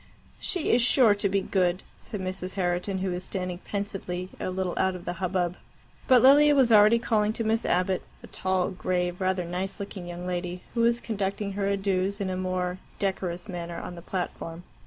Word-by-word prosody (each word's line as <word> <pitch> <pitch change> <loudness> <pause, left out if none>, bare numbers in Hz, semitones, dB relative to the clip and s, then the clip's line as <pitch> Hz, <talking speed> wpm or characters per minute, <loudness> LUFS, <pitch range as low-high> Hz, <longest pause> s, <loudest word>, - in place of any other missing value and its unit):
"She 360 -5 0
is 240 - +5
sure 240 -2 +5
to 200 0 0
be 195 0 +1
good," 185 -2 +1 0.2
said 210 - -6
Mrs. 185 0 -4
Herriton, 185 +1 -1
who 190 - 0
was 180 +1 -3
standing 180 -2 -3
pensively 195 -3 -4
a - - -2
little 185 -1 -2
out 190 0 +1
of 175 - -9
the 175 - -2
hubbub. 180 -1 0 0.5
But 255 -2 +6
Lilia 290 +2 +7
was 260 -4 +4
already 215 +1 +7
calling 220 -2 +1
to 230 - -3
Miss 225 +1 +1
Abbott, 180 +1 +1 0.2
a - - -7
tall, 185 0 0
grave, 180 -1 -1
rather 185 -1 +1
nice 180 +3 -4
looking 195 -3 -6
young 175 0 -6
lady 180 0 -3
who 235 - +1
was 235 +1 +3
conducting 200 -1 -2
her 195 0 -1
adieus 195 0 0
in 190 -2 -1
a - - -2
more 185 0 -2 0.2
decorous 185 -2 -2
manner 175 -3 -5
on - - -7
the 170 - -9
platform. 175 -2 -5
190 Hz, 195 wpm, -27 LUFS, 180-205 Hz, 0.5 s, Lilia